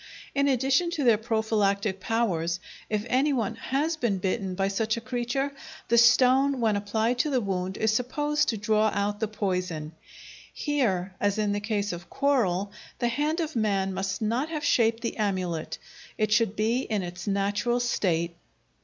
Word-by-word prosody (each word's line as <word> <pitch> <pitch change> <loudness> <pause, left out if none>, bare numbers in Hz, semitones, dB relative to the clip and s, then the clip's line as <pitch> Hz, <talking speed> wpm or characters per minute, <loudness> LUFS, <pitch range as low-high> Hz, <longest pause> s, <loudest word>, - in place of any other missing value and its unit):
In 280 0 +2
addition 270 +6 +2
to 290 - 0
their 230 -4 +5
prophylactic 215 -3 0
powers, 185 -6 0 0.3
if 210 0 -1
any 270 +5 +2
one 230 -4 -1
has 295 +8 -1
been 230 -9 0
bitten 190 0 -2
by 195 +1 +1
such 215 +3 0
a - - -1
creature, 245 +3 -2 0.4
the 235 - +4
stone, 255 +3 +5
when 220 -3 +2
applied 220 +4 0
to 305 - +2
the 265 -3 +2
wound, 190 -3 -2
is 220 0 +2
supposed 295 +6 0
to 225 - -1
draw 215 +1 +2
out 205 +1 -1
the 220 - 0
poison. 180 -7 -2 0.6
Here, 205 - -1
as 205 0 +1
in 210 -1 +1
the 205 - 0
case 205 -2 -2
of 175 +1 -9
coral, 205 -9 +1 0.3
the 240 - 0
hand 300 +7 0
of 315 -3 -4
man 200 -4 +1
must 190 +2 -2
not 240 +8 0
have 305 -2 -3
shaped 230 -1 +3
the 230 - -3
amulet; 185 -6 -2 0.4
it 215 -1 0
should 220 -1 +3
be 225 +4 +1
in 215 -6 -2
its 175 +1 -7
natural 205 +4 0
state. 170 -8 0
220 Hz, 170 wpm, -27 LUFS, 195-245 Hz, 0.6 s, their